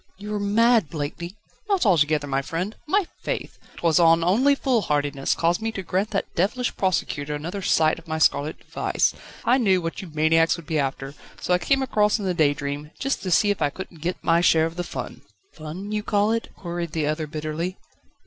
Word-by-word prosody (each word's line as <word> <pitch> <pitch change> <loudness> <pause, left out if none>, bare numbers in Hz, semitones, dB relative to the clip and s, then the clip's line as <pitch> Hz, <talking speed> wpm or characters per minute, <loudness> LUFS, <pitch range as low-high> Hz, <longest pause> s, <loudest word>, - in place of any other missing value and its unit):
"You 210 +2 -6
are 210 - -1
mad, 220 -2 +3
Blakeney!" 165 +4 -5 0.3
"Not 390 -8 +2
altogether, 155 -6 +3
my 135 -1 0
friend. 180 +9 -4
My 390 +4 +2 0.2
faith! - - -4 0.2
'twas 165 -2 +3
not 165 -1 +5
only 245 +11 +4
foolhardiness 150 - 0
caused 170 +4 +1
me 225 0 -1
to 195 - -5
grant 190 +4 -1
that 195 - -3
devilish 230 +8 0
prosecutor 150 -6 -1
another 175 +7 -5
sight 160 -3 +2
of - - -19
my 160 0 -2
scarlet 155 0 +2
device. - - 0 0.3
I 255 +3 +4
knew 195 -6 +3
what 165 +3 -4
you 190 - -9
maniacs 160 +2 +3
would 170 - -11
be 155 0 -1
after, 135 0 -3 0.3
so 180 - 0
I 180 - +3
came 270 +6 +1
across 210 -4 +2
in 205 - -5
the 185 - +1
_Daydream,_just 150 - -1
to 190 - -4
see 205 +4 +4
if 200 - -3
I 145 - +3
couldn't 170 0 -9
get 180 +3 -2
my 165 +1 +3
share 160 -2 +4
of 165 0 -5
the 175 - -2
fun." - - -7 0.3
"Fun, 170 +6 -7
you 210 0 -1
call 205 0 +1
it?" 230 0 -1
queried 170 -2 -5
the 155 -2 0
other 155 +1 -1
bitterly. 155 +4 -4
170 Hz, 200 wpm, -24 LUFS, 155-205 Hz, 0.3 s, not